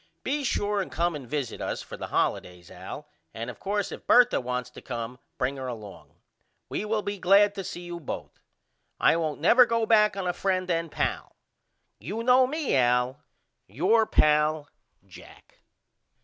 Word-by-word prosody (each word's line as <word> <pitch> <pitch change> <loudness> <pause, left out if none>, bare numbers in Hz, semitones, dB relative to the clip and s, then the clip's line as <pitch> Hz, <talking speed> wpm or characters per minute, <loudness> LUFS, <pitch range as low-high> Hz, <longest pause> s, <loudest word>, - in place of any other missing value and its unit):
Be 290 +2 -1
sure 205 -5 0
and 185 - -6
come 170 +1 0
and 135 -5 -8
visit 140 -6 -3
us - - -3
for - - -9
the - - -6
holidays 90 -1 -2
Al - - -9 0.3
and 115 +2 -4
of - - -16
coarse 205 0 -2
if - - -9
Bertha 245 - +5
wants 125 0 -4
to - - -12
come 120 0 -6 0.2
bring 135 +2 -1
her 130 -1 -5
along. 110 -5 -9 0.5
We - - -3
will 215 0 -1
be 200 -1 -4
glad 200 +3 +5
to 195 -2 -5
see 175 - -6
you 175 -1 -7
both. 155 - -7 0.6
I - - +4
won't 160 -3 -2
never 240 - +6
go 230 -1 +1
back 210 -2 +4
on 190 - -3
a 180 - 0
friend 185 0 -1
and 165 -1 -1
pal. - - -3 0.6
You 215 +8 -5
know 255 +1 +5
me 300 - -1
Al. 125 0 +2 0.5
Your 180 - +2
old 220 - +1
pal, 150 0 +3 0.4
JACK. - - -16
175 Hz, 175 wpm, -27 LUFS, 130-210 Hz, 0.6 s, never